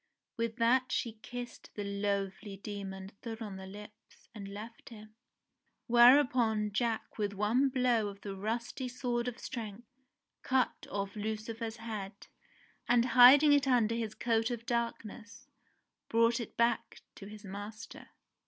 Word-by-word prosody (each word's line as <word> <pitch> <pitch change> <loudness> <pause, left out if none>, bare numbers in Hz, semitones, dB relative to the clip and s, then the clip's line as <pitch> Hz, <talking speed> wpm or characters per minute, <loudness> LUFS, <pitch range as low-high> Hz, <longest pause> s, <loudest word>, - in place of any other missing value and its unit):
With 230 -1 -2
that 250 +2 +2
she 225 -2 -2
kissed 245 +1 -8
the 205 - -3
loathly 200 0 -3
demon 195 -1 -7
full 230 -2 -6
on 205 -4 -6
the 190 0 -9
lips, 210 +2 -14
and 205 -3 -8
left 215 +3 -9
him. 215 -2 -13 0.7
Whereupon 240 -3 +5
Jack 225 +1 -2
with 205 -1 -1
one 220 +7 +2
blow 250 -4 +2
of 200 0 -9
the 200 -1 -6
rusty 230 +6 -3
sword 245 -1 -2
of 245 -1 -4
strength, 230 -3 -7 0.6
cut 260 -1 0
off 200 0 -3
Lucifer's 220 +2 -4
head 215 -3 -7 0.6
and, 240 0 +4
hiding 270 +5 +9
it 285 -1 +3
under 235 -4 +3
his 225 -2 -3
coat 225 -1 +1
of 235 -2 -5
darkness, 230 -1 -4 0.6
brought 230 +1 +3
it 235 - -7
back 235 0 0
to 195 - -11
his 210 0 -11
master. 205 +3 -8
225 Hz, 140 wpm, -32 LUFS, 205-240 Hz, 0.7 s, hiding